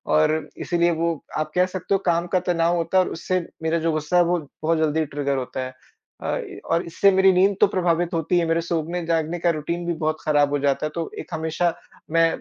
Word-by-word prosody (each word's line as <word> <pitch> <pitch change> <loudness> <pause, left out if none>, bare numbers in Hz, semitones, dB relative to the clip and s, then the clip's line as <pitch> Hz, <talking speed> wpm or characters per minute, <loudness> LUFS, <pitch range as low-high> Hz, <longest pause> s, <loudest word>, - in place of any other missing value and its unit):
और 155 0 +4 0.3
इसीलिए 175 0 +2
वो 165 0 0 0.2
आप 155 0 -2
कह 180 0 +4
सकते 185 +1 -3
हो 195 - +3
काम 170 0 +1
का 185 - +4
तनाव 175 -1 +1
होता 170 +2 0
है 185 - +6
और - - -4
उससे 185 +2 -1 0.2
मेरा 160 +1 +1
जो 165 0 0
गुस्सा 155 +2 0
है, 175 - +6
वो 175 +1 +1 0.2
बहुत 165 +1 +2
जल्दी 155 0 +1
ट्रिगर 140 -1 -2
होता 130 0 -4
है। 130 - -8 0.5
अ, - - -1
ई - - -7
और 165 +1 +1
इससे 195 +4 +3
मेरी 190 0 +5
नींद 195 +2 +4
तो 210 - +7
प्रभावित 175 -3 0
होती 165 +2 +1
है, 170 - +1
मेरे 165 +1 +1
सोने-जागने 165 0 -1
का 170 - +2
रूटीन 170 +3 -3
भी 170 - 0
बहुत 155 0 +1
ख़राब 145 -2 +3
हो 145 - +1
जाता 140 +1 +1
है। - - -1
तो 165 -1 -3
एक - - -8
हमेशा, 160 +2 0 0.4
मैं 165 0 +5
165 Hz, 230 wpm, -23 LUFS, 155-175 Hz, 0.5 s, तो